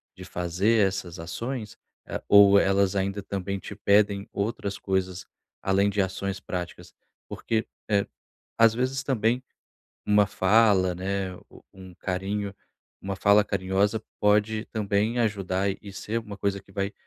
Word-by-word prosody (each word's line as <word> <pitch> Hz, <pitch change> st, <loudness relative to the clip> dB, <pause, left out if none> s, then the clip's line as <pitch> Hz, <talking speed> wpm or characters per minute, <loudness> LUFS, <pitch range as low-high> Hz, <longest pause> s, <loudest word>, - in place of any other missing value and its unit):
de -, -, -10 dB
fazer 95 Hz, +5 st, +1 dB
essas 95 Hz, -2 st, -5 dB
ações, 110 Hz, +7 st, -5 dB, 0.3 s
eh, -, -, -5 dB
ou 100 Hz, 0 st, +8 dB
elas 100 Hz, 0 st, +2 dB
ainda 100 Hz, +1 st, -1 dB
também 100 Hz, 0 st, -3 dB
te 100 Hz, -, -8 dB
pedem 100 Hz, 0 st, +2 dB
outras 100 Hz, -1 st, -3 dB
coisas, 95 Hz, -1 st, -2 dB, 0.4 s
além 100 Hz, +1 st, +2 dB
de 100 Hz, 0 st, +1 dB
ações 95 Hz, 0 st, -2 dB
práticas? 90 Hz, -2 st, -6 dB, 0.4 s
Porque, 110 Hz, -1 st, -2 dB, 0.2 s
eh, 100 Hz, -2 st, +2 dB, 0.5 s
às 115 Hz, -1 st, +6 dB
vezes, 130 Hz, +2 st, -1 dB
também 125 Hz, -1 st, +1 dB, 0.6 s
uma 105 Hz, -1 st, +4 dB
fala, 95 Hz, -2 st, +3 dB
né, 95 Hz, +1 st, -3 dB
o -, -, -16 dB
um 95 Hz, -1 st, -12 dB
carinho, 100 Hz, +3 st, -3 dB, 0.5 s
uma 95 Hz, 0 st, -4 dB
fala 100 Hz, +2 st, +5 dB
carinhosa 100 Hz, +2 st, 0 dB, 0.2 s
pode 105 Hz, +1 st, +2 dB
também 110 Hz, +2 st, 0 dB
ajudar 100 Hz, -3 st, 0 dB
e 100 Hz, -2 st, -10 dB
ser 110 Hz, +3 st, -3 dB
uma 105 Hz, -3 st, -8 dB
coisa 100 Hz, 0 st, -1 dB
que 95 Hz, -, -21 dB
vai 100 Hz, +1 st, -2 dB
100 Hz, 140 wpm, -26 LUFS, 95-105 Hz, 0.6 s, ou